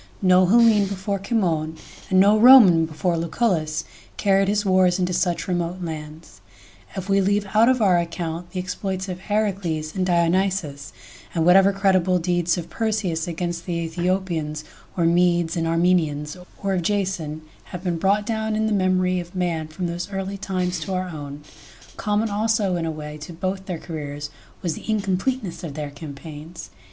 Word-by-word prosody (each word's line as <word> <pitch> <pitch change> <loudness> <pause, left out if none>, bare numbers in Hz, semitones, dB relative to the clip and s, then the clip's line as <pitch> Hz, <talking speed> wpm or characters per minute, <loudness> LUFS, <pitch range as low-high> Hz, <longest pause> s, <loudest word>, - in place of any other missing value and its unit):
No 185 0 +5
Hellene 220 -1 +5
before 195 +1 -3
Cimon 170 -7 -1 0.3
and 185 -1 +4
no 200 +2 +6
Roman 215 -9 +8
before 165 +2 -1
Lucullus 165 -3 0 0.3
carried 195 -1 +3
his 205 +1 0
wars 185 -1 +3
into 180 -1 -1
such 175 -1 0
remote 175 0 -2
lands, 155 - -8 0.5
if 190 0 -5
we 195 0 +3
leave 205 +1 +1
out 225 +3 +5
of 255 -3 +2
our 180 -3 +4
account 170 0 -4
the 185 - -5
exploits 185 +1 -4
of 180 -1 -5
Heracles 195 -6 -2
and 190 - 0
Dionysus, 175 -4 0 0.4
and 165 -1 +1
whatever 190 +3 +6
credible 190 -2 +2
deeds 175 0 0
of 170 - -5
Perseus 205 -7 -2
against 170 0 -4
the 175 -2 -1
Aethiopians 170 -3 -2 0.3
or 170 - +2
Medes 170 -1 +2
and 165 -1 -1
Armenians, 165 -3 +1 0.3
or 195 -1 0
of 185 - 0
Jason, 175 -5 -2 0.2
have 180 -1 -8
been 175 -3 -1
brought 200 +3 +2
down 220 -1 -1
in 220 0 0
the 220 - 0
memory 185 -1 +1
of 175 +1 -9
man 170 -4 -1
from 155 +4 -5
those 175 +3 -4
early 195 0 -3
times 185 -2 -2
to 190 - -3
our 185 0 -2
own. 145 -2 -8 0.5
..Common 210 +1 0
also 210 -2 +1
in 165 -1 -2
a - - -1
way 150 -1 -7
to 155 +3 -8
both 190 +3 -4
their 180 -3 -3
careers 145 -3 -6 0.3
was 170 -3 0
the - - -10
incompleteness 200 0 -1
of 150 -5 -6
their 150 -2 -5
campaigns. 150 - -9
180 Hz, 170 wpm, -23 LUFS, 165-195 Hz, 0.5 s, Roman